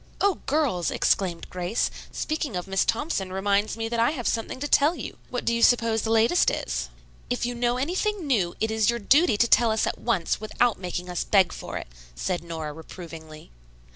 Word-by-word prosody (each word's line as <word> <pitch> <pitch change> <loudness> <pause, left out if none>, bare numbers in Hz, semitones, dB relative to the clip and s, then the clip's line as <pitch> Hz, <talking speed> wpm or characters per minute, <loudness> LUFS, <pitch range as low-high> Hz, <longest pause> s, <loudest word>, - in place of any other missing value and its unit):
"O 400 -4 +2
girls!" 265 - +1
exclaimed 180 -4 0
Grace. 180 +5 -1 0.2
"Speaking 310 - -3
of 180 - -3
Miss 195 -1 +1
Thompson, 225 - -1
reminds 200 +3 0
me 225 0 -2
that 235 0 -2
I 230 - +4
have 270 -6 -3
something 225 +2 -2
to 290 - -2
tell 295 +4 +4
you. - - -7
What 245 - -4
do 235 - +2
you 235 - 0
suppose 230 -2 +4
the 220 - -3
latest 225 +10 +4
is?" - - -3 0.4
"If - - -1
you 245 - -2
know 240 0 0
anything 365 +7 -1
new, 205 -11 +1
it 220 0 0
is 220 -1 +2
your 235 - +1
duty 250 - +4
to 235 - +4
tell 235 0 +5
us 220 0 +1
at - - -3
once, 200 -6 0
without 220 +1 +1
making 180 -1 -4
us 180 -1 -2
beg 190 -4 +3
for - - -6
it," - - -6 0.3
said 175 - -2
Nora 160 -3 -5
reprovingly. 160 - -11
220 Hz, 200 wpm, -25 LUFS, 180-245 Hz, 0.4 s, tell